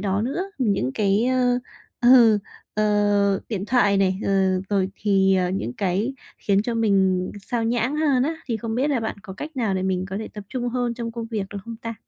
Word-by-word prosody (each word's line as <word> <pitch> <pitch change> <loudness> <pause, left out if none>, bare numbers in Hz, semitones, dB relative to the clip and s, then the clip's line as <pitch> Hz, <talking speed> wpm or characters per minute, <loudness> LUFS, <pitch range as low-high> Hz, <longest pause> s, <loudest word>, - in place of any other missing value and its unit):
đó 200 +1 0
nữa. 350 - -3
Những 200 - +1
cái, 205 +3 +2
ơ, 250 -1 +2 0.4
ờ, 240 -3 +7 0.4
ờ, 205 -2 +2
điện 200 -4 -3
thoại 205 -4 +3
này, 190 -1 +2
ờ, 190 -1 +2
rồi 195 -2 +1
thì, 195 -2 +3
ờ, 180 -1 +1
những 150 - -3
cái 200 - -1 0.2
khiến 200 0 +1
cho 235 0 -2
mình 190 -4 +2
xao 235 -1 -2
nhãng 240 +5 0
hơn 285 -5 +2
á, 320 +4 -1
thì 230 -3 -1
không 225 0 -4
biết 275 +4 +1
là 260 - +1
bạn 220 - -3
có 195 -3 -8
cách 295 +7 -8
nào 220 -6 0
để 185 - -1
mình 185 -1 -1
có 195 - -3
thể 220 - -5
tập 210 -1 -9
trung 245 -2 -3
hơn 245 -1 -1
trong 230 -1 -5
công 230 -1 -5
việc 215 -4 -3
được 205 - -5
không 230 -1 -7
ta? 230 0 -6
215 Hz, 220 wpm, -23 LUFS, 195-245 Hz, 0.4 s, ờ